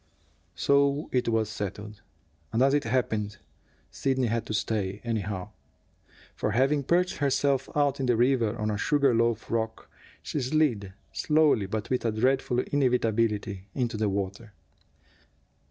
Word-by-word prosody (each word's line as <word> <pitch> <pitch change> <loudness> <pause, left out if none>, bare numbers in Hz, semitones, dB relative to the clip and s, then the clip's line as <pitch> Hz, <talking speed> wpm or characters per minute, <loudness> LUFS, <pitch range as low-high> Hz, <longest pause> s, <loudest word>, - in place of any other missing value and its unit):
So 140 +1 +2
it 125 -2 +1
was 110 -1 +1
settled. 105 0 -6 0.5
And, 120 - +2
as 135 +1 +4
it 145 -1 +1
happened, 110 -4 -1 0.5
Sidney 130 -2 0
had 115 0 -1
to - - -3
stay, 100 -2 -1
anyhow. 105 -4 -3 0.8
For, - - -2
having 135 +4 +2
perched 175 +6 +1
herself 140 -1 +1
out 145 -2 +2
in 130 - -1
the 120 -2 +3
river 120 -2 +2
on 110 -1 -1
a 105 - -2
sugar 140 +1 +3
loaf 115 -1 0
rock, 110 -1 -3 0.3
she 150 - -3
slid, 125 -8 0 0.2
slowly 150 -10 +3
but 105 +3 -4
with 125 - 0
a 115 - +1
dreadful 125 +2 +1
inevitability, 115 -8 0
into 120 -3 -1
the 105 -1 0
water. 100 +2 -4
115 Hz, 140 wpm, -27 LUFS, 105-135 Hz, 0.8 s, as